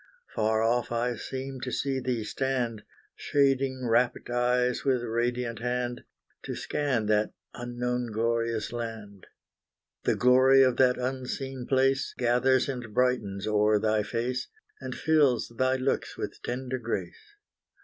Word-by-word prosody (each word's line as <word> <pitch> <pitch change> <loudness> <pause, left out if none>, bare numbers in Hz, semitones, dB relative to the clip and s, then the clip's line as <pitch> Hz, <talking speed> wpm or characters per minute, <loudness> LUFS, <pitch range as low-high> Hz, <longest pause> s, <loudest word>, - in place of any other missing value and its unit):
Far 110 +1 +1
off 120 +2 +1
I 120 +1 0
seem 130 +3 -6
to 125 - -4
see 135 0 -1
thee 125 -3 -2
stand, 120 -2 -2 0.3
Shading 135 -2 +1
rapt 120 +1 +1
eyes 125 0 +1
with 130 -3 +1
radiant 120 +1 -1
hand, 125 0 -2 0.4
To - - -4
scan 130 -7 -1
that 105 0 +1 0.2
unknown 120 0 -3
glorious 115 0 -1
land. 110 -4 -6 0.8
The - - +3
glory 130 +2 +6
of 130 -2 +2
that 125 -1 +4
unseen 130 0 -4
place, 135 0 +2
Gathers 125 +2 +3
and 125 -6 -5
brightens 110 -6 +1
o'er 105 0 +3
thy 110 0 +1
face, 125 +4 -2 0.3
And - - -6
fills 150 -8 +2
thy 130 +2 +2
looks 130 +1 -1
with - - -5
tender 130 +1 -3
grace. 415 - -5
125 Hz, 130 wpm, -28 LUFS, 115-130 Hz, 0.8 s, glory